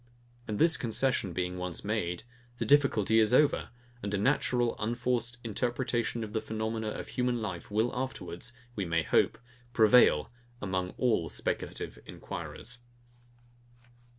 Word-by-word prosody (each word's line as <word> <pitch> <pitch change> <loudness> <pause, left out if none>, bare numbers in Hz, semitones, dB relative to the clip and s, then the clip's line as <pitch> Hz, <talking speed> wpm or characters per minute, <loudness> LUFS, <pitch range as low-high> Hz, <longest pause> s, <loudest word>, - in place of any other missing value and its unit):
And 105 -2 -2
this 160 +3 +5
concession 120 -4 +1
being 90 +1 -2
once 90 0 -4
made, 90 -5 -1 0.3
the - - -2
difficulty 115 -7 +4
is 110 +3 +4
over; 150 +1 +3 0.3
and 100 - -3
a - - +1
natural 120 +1 +2
unforced 120 +1 -1
interpretation 120 +1 -1
of 105 -1 -7
the 110 - 0
phenomena 110 0 -3
of 105 - -5
human 125 -1 0
life 95 -6 -5
will 110 +3 +1
afterwards, 120 -5 -4 0.2
we 100 - -1
may 85 -2 +1
hope, - - +2 0.4
prevail 110 -8 +5 0.3
among 95 -3 -2
all 110 -10 +1
speculative - - -4
enquirers. 125 +1 -7
110 Hz, 130 wpm, -30 LUFS, 100-120 Hz, 0.4 s, this